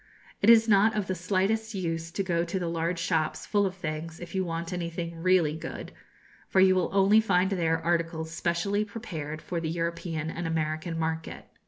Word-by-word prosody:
It 200 Hz, -, +5 dB
is 225 Hz, -1 st, +7 dB
not 215 Hz, +1 st, +4 dB
of 205 Hz, -, 0 dB
the 185 Hz, -, -2 dB
slightest 200 Hz, +5 st, 0 dB
use 165 Hz, -3 st, -2 dB
to 195 Hz, +4 st, -2 dB
go 170 Hz, -3 st, 0 dB
to 175 Hz, +2 st, -3 dB
the 175 Hz, -2 st, -2 dB
large 170 Hz, +1 st, -1 dB
shops, 165 Hz, -2 st, -1 dB
full 205 Hz, -2 st, +2 dB
of 190 Hz, -, -6 dB
things, 160 Hz, -2 st, -5 dB
if 175 Hz, -, -9 dB
you 190 Hz, -1 st, 0 dB
want 170 Hz, 0 st, -4 dB
anything 170 Hz, -1 st, -4 dB
really 175 Hz, -4 st, +3 dB
good, 160 Hz, -, -7 dB, 0.6 s
for 190 Hz, -, +3 dB
you 190 Hz, 0 st, +6 dB
will 185 Hz, -1 st, +1 dB
only 200 Hz, +2 st, +5 dB
find 190 Hz, -2 st, +2 dB
there 165 Hz, -4 st, +1 dB
articles 165 Hz, -1 st, -1 dB
specially 170 Hz, +5 st, 0 dB
prepared 165 Hz, -9 st, -6 dB
for 175 Hz, -, -3 dB
the 160 Hz, -, -2 dB
European 165 Hz, -1 st, -3 dB
and 170 Hz, 0 st, -4 dB
American 160 Hz, +1 st, -2 dB
market. 160 Hz, 0 st, -3 dB
170 Hz, 190 wpm, -28 LUFS, 165-190 Hz, 0.6 s, is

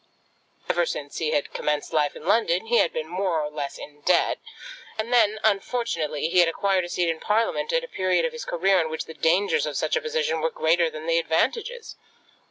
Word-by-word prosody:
Ever 175 Hz, -1 st, +1 dB
since 145 Hz, -1 st, -5 dB
he 160 Hz, -, 0 dB
had 150 Hz, -2 st, -1 dB
commenced 150 Hz, +2 st, -2 dB
life 150 Hz, -2 st, +1 dB
in 155 Hz, -, -11 dB
London 195 Hz, -1 st, +2 dB
he 235 Hz, +1 st, +2 dB
had -, -, +3 dB
been 155 Hz, -, -3 dB
more 180 Hz, -1 st, -1 dB
or 150 Hz, -1 st, -3 dB
less 145 Hz, -2 st, -5 dB
in 145 Hz, 0 st, -11 dB
debt; 180 Hz, +5 st, +2 dB, 0.6 s
and 225 Hz, +3 st, -2 dB
then, 215 Hz, -3 st, +4 dB
unfortunately, 195 Hz, -, 0 dB
he 180 Hz, +2 st, +2 dB
had 175 Hz, -1 st, +6 dB
acquired 190 Hz, +2 st, +1 dB
a -, -, -8 dB
seat 175 Hz, 0 st, 0 dB
in 165 Hz, -1 st, -1 dB
Parliament 225 Hz, -, 0 dB
at -, -, +1 dB
a -, -, -6 dB
period 185 Hz, -, +1 dB
of 245 Hz, -, -2 dB
his 235 Hz, -1 st, -6 dB
career 185 Hz, +2 st, +2 dB
in 160 Hz, -, -2 dB
which 160 Hz, -, -4 dB
the 160 Hz, -, -9 dB
dangers 190 Hz, -, +2 dB
of -, -, -3 dB
such -, -, 0 dB
a 475 Hz, -, 0 dB
position 470 Hz, 0 st, -1 dB
were -, -, +1 dB
greater 170 Hz, -, +2 dB
than 155 Hz, 0 st, -8 dB
the 165 Hz, 0 st, +2 dB
advantages. 445 Hz, -, -1 dB
180 Hz, 215 wpm, -25 LUFS, 160-230 Hz, 0.6 s, had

